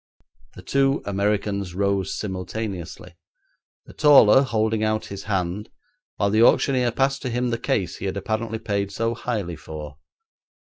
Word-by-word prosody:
The - - -11
two 135 0 +1
Americans 100 -2 -1
rose 100 -1 0
simultaneously, 95 -3 -5 0.7
the - - -14
taller 135 -5 +7
holding 110 -4 0
out 110 0 0
his 100 - -8
hand 95 0 -2 0.5
while 100 0 0
the 110 +1 +3
auctioneer 125 0 +4
passed 135 +2 0
to 130 - -3
him 125 +1 -1
the 115 - -2
case 90 -7 -1
he - - -6
had 95 0 -2
apparently 110 +2 -2
paid 100 -2 -2
so 115 +3 -1
highly 105 -7 -3
for. 75 -1 -9
105 Hz, 145 wpm, -23 LUFS, 95-115 Hz, 0.7 s, taller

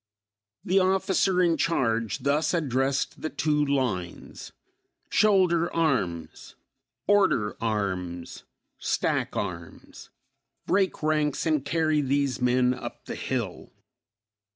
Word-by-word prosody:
The 190 +2 +3
officer 190 0 +2
in 170 -2 +2
charge 115 - 0
thus 150 +4 +1
addressed 135 -3 -1
the 155 - -2
two 150 -2 0
lines: 125 -12 -3 0.6
"Shoulder 180 -5 +3
arms!" 130 - -2 0.5
"Order 190 - +2
arms!" 95 -6 -3 0.4
"Stack - - -1
arms!" 85 -2 -7 0.6
"Break 190 -4 0
ranks 150 -2 0
and 155 -4 +1
carry 155 0 +1
these 140 -1 0
men 125 0 +3
up - - -8
the - - -5
hill!" - - -4
145 Hz, 100 wpm, -26 LUFS, 120-170 Hz, 0.6 s, The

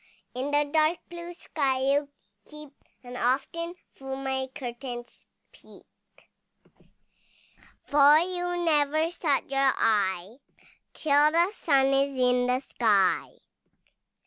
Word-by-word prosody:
In 255 +3 -4
the 290 0 +2
dark 310 +3 +1
blue 345 0 -8
sky 275 -6 -2
you 280 +2 +1 0.4
keep, 300 -2 -12 0.3
And 245 0 -10
often 335 +8 -2 0.2
through 270 0 -7
my 265 -1 -3
curtains 240 -1 -7 0.3
peep, - - -18 2.0
For 290 +1 +6
you 355 0 -2
never 310 +1 +2
shut 310 -5 -1
your 275 -1 +2
eye, 200 -1 0 0.6
Till 295 0 +3
the 340 +4 +2
sun 275 -9 +2
is 275 0 0
in 250 0 +2
the 250 +1 +1
sky. 210 -8 +1
275 Hz, 110 wpm, -26 LUFS, 255-310 Hz, 2.0 s, For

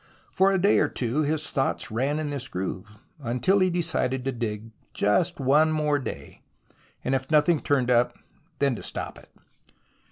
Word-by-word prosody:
For 195 +1 +3
a 195 - +2
day 200 +3 +4
or - - +2
two 125 +4 -1
his 155 +1 -1
thoughts 135 -2 -1
ran 135 +7 0
in 155 -2 -3
this 135 -2 -3
groove, 95 +1 -5 0.3
until 125 +9 +1
he 185 -1 +3
decided 165 -7 -1
to 135 - 0
dig 115 -2 -4 0.2
just 105 - +1
one 145 +4 +4
more 150 -2 +1
day, 135 - -8 0.6
and 130 - 0
if 135 0 -1
nothing 155 +1 +3
turned 130 -3 +1
up 120 0 +2 0.4
then 140 -2 +2
to - - -8
stop - - -6
it. - - -19
140 Hz, 170 wpm, -26 LUFS, 125-155 Hz, 0.6 s, day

